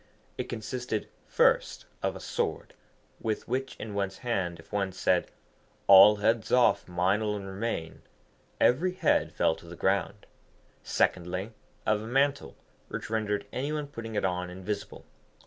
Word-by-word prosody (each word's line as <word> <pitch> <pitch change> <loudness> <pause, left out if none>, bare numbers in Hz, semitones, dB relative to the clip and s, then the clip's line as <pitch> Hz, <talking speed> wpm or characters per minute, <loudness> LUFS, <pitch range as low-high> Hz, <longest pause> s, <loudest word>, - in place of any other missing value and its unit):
It - - -3
consisted, 120 0 -4 0.2
first, - - +2 0.2
of - - -1
a - - -7
sword, - - -3 0.5
with 110 -1 -3
which 130 +2 -2
in 110 -1 -7
one's 100 -1 -2
hand, 90 -8 -1
if 80 - -16
one 100 -2 0
said, 95 - +1 0.6
'All 100 +2 +9
heads 110 +1 +1
off, 125 -1 +4
mine 90 +4 +1
alone 105 -2 -2
remain,' 95 -4 -4 0.6
every 175 +9 +3
head 185 - +2
fell - - +2
to 85 +1 -15
the 85 - -9
ground. 100 +3 0 0.6
Secondly, 90 +4 0 0.3
of 105 -1 +2
a 110 - -7
mantle 140 +3 +1 0.3
which - - -6
rendered 105 -2 -1
any 140 +4 -2
one 150 -1 -2
putting 115 -6 -7
it 105 - +1
on 90 -1 -1
invisible. 95 +3 -6
105 Hz, 145 wpm, -29 LUFS, 95-115 Hz, 0.6 s, All